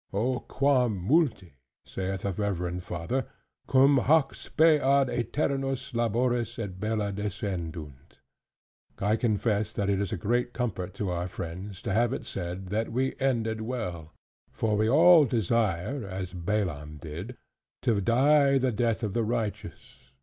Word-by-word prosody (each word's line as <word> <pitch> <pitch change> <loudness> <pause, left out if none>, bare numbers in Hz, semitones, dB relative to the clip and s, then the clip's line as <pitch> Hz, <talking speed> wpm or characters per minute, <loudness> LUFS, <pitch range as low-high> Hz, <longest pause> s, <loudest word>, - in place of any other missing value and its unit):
"O 120 +5 0
quam 130 -6 +1
multi," 95 - +1 0.3
saith 95 0 -4
a 100 - 0
reverend 90 -2 -2
father, 90 +9 -3 0.4
"cum 135 +1 +5
hac 150 +2 +3
spe 155 -2 +3
ad 135 0 +3
aeternos 135 +1 -2
labores 120 0 0
et 100 -5 -5
bella 105 -1 -1
descendunt!" 85 -8 -5 0.8
I 105 +2 +1
confess 110 -2 0
that 100 0 0
it 100 0 +1
is 100 - -2
a - - -2
great 120 +6 0
comfort 100 -6 -3
to 100 -2 -2
our 90 0 -2
friends, 90 +2 -7
to 95 - -2
have 120 +3 +2
it - - -5
said, 90 +1 -5
that 110 +3 -1
we 130 +3 0
ended 115 -5 0
well; 90 -10 -5 0.4
for 110 -1 0
we 110 +1 +2
all 165 +3 +7
desire 115 0 0
(as 95 -2 -5
Balaam 85 -5 -2
did) 85 +11 -7 0.5
"to 105 -4 +2
die 140 +5 +4
the 130 -1 +1
death 115 +1 0
of 105 -3 -2
the 115 - +1
righteous." 110 - -5
110 Hz, 145 wpm, -28 LUFS, 95-125 Hz, 0.8 s, all